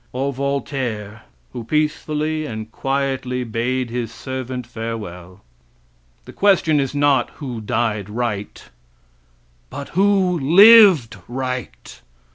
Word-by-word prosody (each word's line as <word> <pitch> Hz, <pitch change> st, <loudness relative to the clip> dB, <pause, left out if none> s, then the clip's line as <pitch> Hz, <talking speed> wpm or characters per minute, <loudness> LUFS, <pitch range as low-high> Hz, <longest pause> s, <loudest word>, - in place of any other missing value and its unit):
or 135 Hz, +2 st, -2 dB
Voltaire, 130 Hz, -6 st, -3 dB, 0.3 s
who 120 Hz, -, -6 dB
peacefully 155 Hz, +2 st, -1 dB
and 110 Hz, -2 st, -7 dB
quietly 135 Hz, -2 st, -2 dB
bade 120 Hz, +2 st, -2 dB
his 120 Hz, -2 st, -3 dB
servant 130 Hz, 0 st, -6 dB
farewell? 105 Hz, -6 st, -7 dB, 0.8 s
The -, -, -12 dB
question 180 Hz, -7 st, +3 dB
is 135 Hz, 0 st, -2 dB
not 145 Hz, -1 st, +2 dB
who 125 Hz, -6 st, -6 dB
died 105 Hz, -2 st, -2 dB
right, 105 Hz, -2 st, -4 dB, 1.1 s
but 140 Hz, -, -7 dB
who 190 Hz, -2 st, +2 dB
lived 175 Hz, -, +7 dB
right. 125 Hz, -, -6 dB
130 Hz, 100 wpm, -20 LUFS, 115-145 Hz, 1.1 s, lived